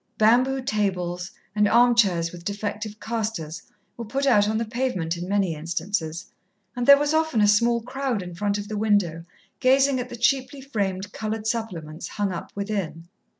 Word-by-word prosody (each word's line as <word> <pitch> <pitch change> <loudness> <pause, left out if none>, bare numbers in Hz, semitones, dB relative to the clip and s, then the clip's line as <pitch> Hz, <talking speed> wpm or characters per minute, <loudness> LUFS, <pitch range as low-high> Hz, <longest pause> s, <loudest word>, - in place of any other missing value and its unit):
Bamboo 250 +5 +3
tables, 180 -5 -1 0.3
and 210 -1 +4
armchairs 220 -8 +4
with 175 -1 -10
defective 210 +2 -4
castors, 215 -9 -3 0.4
were 235 - -5
put 270 +6 -1
out 210 -6 +4
on 220 - 0
the 230 - -1
pavement 215 -8 -2
in 175 +2 -6
many 195 -4 +1
instances, 165 +1 -3 0.5
and 245 -1 -2
there 280 0 +10
was 290 +1 0
often 315 -6 +2
a 210 - +5
small 235 +3 +3
crowd 255 -4 -2
in 175 -1 -8
front 205 +3 -1
of 205 0 -5
the 215 -1 -4
window 205 -6 +1 0.4
gazing 270 +1 +4
at 250 0 -4
the 240 - -6
cheaply 260 +3 +1
framed 200 -7 -3
coloured 220 0 -4
supplements 180 -9 -4
hung 205 -2 -2
up 170 - -6
within. 195 -5 -4
210 Hz, 170 wpm, -24 LUFS, 180-240 Hz, 0.5 s, there